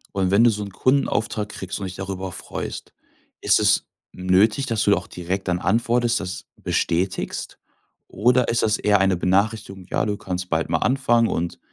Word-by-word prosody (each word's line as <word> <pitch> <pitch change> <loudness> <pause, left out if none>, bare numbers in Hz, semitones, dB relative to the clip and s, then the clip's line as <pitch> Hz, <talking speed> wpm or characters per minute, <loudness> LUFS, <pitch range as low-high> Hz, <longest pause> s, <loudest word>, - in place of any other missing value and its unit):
Und 95 -1 +1
wenn 100 +5 +4
du 120 - +6
so 105 -1 -4
'n 100 - -6
Kundenauftrag 110 -2 0
kriegst, 95 -1 -6
und 100 - -4
dich 90 - -8
darüber 95 -1 -5
freust, - - -6 0.5
ist - - +4
es - - +3 0.2
nötig, 100 +8 +2
dass 115 -3 0
du 100 - +3
da - - +4
auch 90 - -6
direkt 90 +3 -4
dann 90 -1 +1
antwortest, 120 +5 +1
das 95 -1 -6
bestätigst? 90 +3 -2 0.5
Oder 125 +4 +2
ist 115 - +1
das 105 -1 +2
eher 105 -1 +3
eine 95 -2 +2
Benachrichtigung: 95 +1 0
„Ja, - - 0
du 105 - -1
kannst 90 -1 -5
bald 80 0 0
mal 80 - +2
anfangen 120 -3 +2
und 85 +1 -3
100 Hz, 185 wpm, -22 LUFS, 90-115 Hz, 0.5 s, du